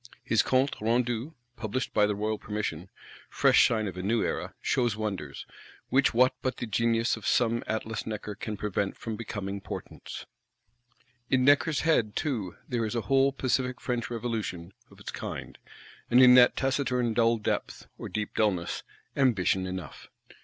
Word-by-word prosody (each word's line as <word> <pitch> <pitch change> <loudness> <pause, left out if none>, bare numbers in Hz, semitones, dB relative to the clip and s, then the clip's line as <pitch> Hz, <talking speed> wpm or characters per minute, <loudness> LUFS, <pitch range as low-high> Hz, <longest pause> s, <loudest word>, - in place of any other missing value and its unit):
His 115 - +3
Compte 130 +2 +1
Rendu, 120 +5 0 0.2
published 120 +3 -3
by 105 -1 +4
the 105 - -1
royal 105 +1 -2
permission, 100 -5 -4 0.4
fresh - - +5
sign 110 -2 0
of 95 - -5
a 90 - -4
New 110 +4 +1
Era, - - -3
shows 120 -4 +1
wonders;—which 105 - -2
what 125 +2 +4
but 130 - -2
the - - -3
genius 115 +2 +1
of - - -7
some 115 -1 +2
Atlas 110 0 -3
Necker 105 -1 -4
can 105 +1 -5
prevent 100 -1 -2
from 115 -2 -5
becoming 100 -3 -5
portents? - - -8 1.0
In 130 -1 +3
Necker's 145 +1 +4
head 120 -10 +2
too 110 - -2
there 120 -2 -1
is 110 +2 -2
a 115 - 0
whole 135 +6 +3
pacific 130 -1 -1
French 120 -2 -2
Revolution, 110 -7 -4 0.2
of - - -18
its - - -7
kind; - - -7 0.5
and 120 - +5
in 125 -1 +9
that 125 -1 +7
taciturn 130 -3 0
dull 115 0 +3
depth, 105 - -3
or - - -6
deep 105 -1 -3
dulness, 95 -6 0 0.3
ambition 95 -8 +2
enough. 90 -3 -7
115 Hz, 160 wpm, -28 LUFS, 105-125 Hz, 1.0 s, in